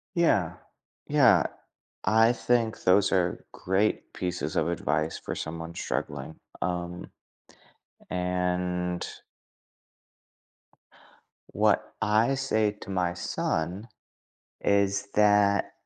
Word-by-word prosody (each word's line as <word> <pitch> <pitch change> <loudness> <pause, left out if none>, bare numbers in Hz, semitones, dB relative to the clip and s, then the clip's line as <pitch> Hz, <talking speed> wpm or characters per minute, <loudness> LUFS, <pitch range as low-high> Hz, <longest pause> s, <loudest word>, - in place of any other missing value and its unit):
Yeah. 105 - +2 0.5
Yeah. 125 - +5 0.6
I 110 +3 +5
think 120 -2 0
those 95 +2 +4
are 90 -2 0
great 95 +3 -1
pieces 90 -4 -3
of 80 - +1
advice 80 -2 -1
for - - -5
someone 80 +1 -6
struggling. 75 0 -4 0.2
Um. 90 0 -3 1.0
And 90 0 -1 2.5
What - - +2
I 110 +5 +3
say 110 -6 +1
to - - -9
my 90 -2 0
son 90 +3 -2 0.8
is 100 0 +2
that, 105 -1 +4
90 Hz, 85 wpm, -27 LUFS, 85-105 Hz, 2.5 s, Yeah